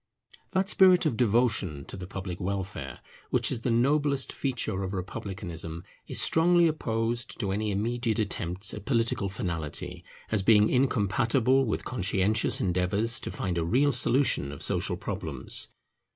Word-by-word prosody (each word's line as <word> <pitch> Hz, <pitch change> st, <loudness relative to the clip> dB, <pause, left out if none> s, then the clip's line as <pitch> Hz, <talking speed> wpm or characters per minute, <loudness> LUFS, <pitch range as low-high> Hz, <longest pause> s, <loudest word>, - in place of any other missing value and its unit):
That 190 Hz, 0 st, +1 dB
spirit 185 Hz, -3 st, +5 dB
of 150 Hz, -, +1 dB
devotion 110 Hz, -, +1 dB
to -, -, -7 dB
the 90 Hz, -2 st, -8 dB
public 95 Hz, -2 st, -6 dB
welfare, 95 Hz, 0 st, -5 dB, 0.3 s
which -, -, +1 dB
is 115 Hz, -, -2 dB
the 125 Hz, -, -1 dB
noblest 140 Hz, +3 st, +1 dB
feature 125 Hz, -8 st, -2 dB
of 95 Hz, 0 st, -4 dB
republicanism, 90 Hz, -3 st, -6 dB, 0.2 s
is -, -, -1 dB
strongly 170 Hz, +1 st, +4 dB
opposed 115 Hz, -5 st, -2 dB
to 100 Hz, -5 st, -2 dB
any 105 Hz, +2 st, -1 dB
immediate 115 Hz, +3 st, -1 dB
attempts 95 Hz, -2 st, -1 dB
at 105 Hz, -, -8 dB
political 115 Hz, -5 st, 0 dB
finality, 85 Hz, -7 st, -5 dB, 0.3 s
as 105 Hz, -3 st, +2 dB
being 105 Hz, +1 st, +5 dB
incompatible 125 Hz, +1 st, +2 dB
with 110 Hz, -, -3 dB
conscientious 105 Hz, -2 st, +1 dB
endeavours 100 Hz, +6 st, 0 dB
to -, -, -6 dB
find 90 Hz, -2 st, -3 dB
a -, -, 0 dB
real 130 Hz, -, +2 dB
solution 130 Hz, -, +2 dB
of 70 Hz, -, -8 dB
social -, -, -1 dB
problems. -, -, +2 dB
110 Hz, 145 wpm, -27 LUFS, 95-125 Hz, 0.3 s, spirit